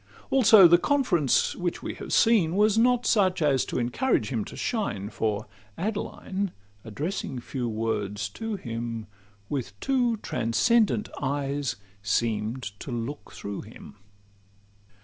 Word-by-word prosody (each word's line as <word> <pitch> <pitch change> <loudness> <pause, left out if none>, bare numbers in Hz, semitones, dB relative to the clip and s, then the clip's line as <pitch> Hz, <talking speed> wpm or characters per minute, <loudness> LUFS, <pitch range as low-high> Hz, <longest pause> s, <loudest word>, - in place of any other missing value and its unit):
Also 220 -8 +8
the 175 +1 +6
conference 185 - +2
which 175 -1 -3
we - - -3
have - - -8
seen 195 -8 +4
Was 210 +1 +4
not 245 +1 +3
such 190 -5 +3
as 140 -5 +3
to - - -4
encourage 120 - 0
him 115 -5 -1
to - - -9
shine; 110 - -2
For 105 0 -1 0.3
Adeline, 200 -1 -3 0.3
addressing 135 - -4
few 120 0 -4
words 105 -2 -2
to 225 - -4
him, 115 - -5 0.4
With 115 -7 -4
two 245 - +1
transcendent 210 - +1
eyes 140 0 -1 0.3
seem'd 110 +3 -1 0.2
to - - -8
look 120 +4 -5
through 100 -1 -6
him. 105 -1 -13
145 Hz, 130 wpm, -26 LUFS, -, 0.4 s, Also